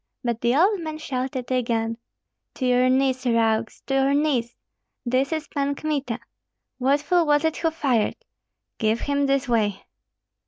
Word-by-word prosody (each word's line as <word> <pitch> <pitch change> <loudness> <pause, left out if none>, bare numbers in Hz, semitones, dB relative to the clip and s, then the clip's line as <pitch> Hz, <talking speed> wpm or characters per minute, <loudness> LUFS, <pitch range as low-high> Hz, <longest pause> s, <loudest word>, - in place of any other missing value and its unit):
But 235 -2 -2
the 240 +1 +2
old 385 +6 +3
man 315 -2 -5
shouted 260 -4 -4
again, 230 -2 0 0.6
"To 260 - -2
your 250 0 +3
knees, 260 0 +2
rogues, 230 -2 +1
to 270 - -3
your 270 +1 +3
knees! 265 -6 0 0.5
This 255 +4 +1
is 315 -2 -2
Pan 280 -1 -1
Kmita! 280 -6 -2 0.6
What 275 +3 +2
fool 350 0 +2
was 295 +1 +3
it 320 - 0
who 330 - +1
fired? 270 -9 0 0.6
Give 220 0 +1
him 285 0 0
this 275 0 +1
way!" 210 -5 0
265 Hz, 155 wpm, -24 LUFS, 235-290 Hz, 0.6 s, old